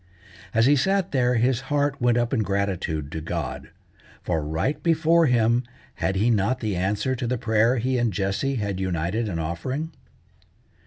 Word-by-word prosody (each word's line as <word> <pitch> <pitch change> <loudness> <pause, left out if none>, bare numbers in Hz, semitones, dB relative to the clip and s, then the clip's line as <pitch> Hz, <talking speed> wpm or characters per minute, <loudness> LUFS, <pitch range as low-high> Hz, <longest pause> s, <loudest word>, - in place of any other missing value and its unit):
As 115 0 +3
he 145 +3 +5
sat 190 +7 +1
there 125 -2 +2
his 120 +2 +2
heart 145 -2 0
went 120 0 +3
up 120 +1 0
in 130 - +2
gratitude 95 -7 -2
to 80 - -4
God, 85 -3 -4 0.5
for 80 - -1
right 80 - -2
before 165 0 +3
him 120 0 +3 0.3
had 95 - -1
he 110 +5 +2
not 110 +4 +1
the 105 -4 -2
answer 100 +7 0
to 125 -1 -3
the 125 +1 0
prayer 115 +1 +2
he 125 +2 0
and 120 -2 +1
Jessie 100 +8 -1
had 100 -5 -2
united 95 +4 -1
in 85 - -3
offering? 105 - -3
115 Hz, 170 wpm, -24 LUFS, 95-130 Hz, 0.5 s, he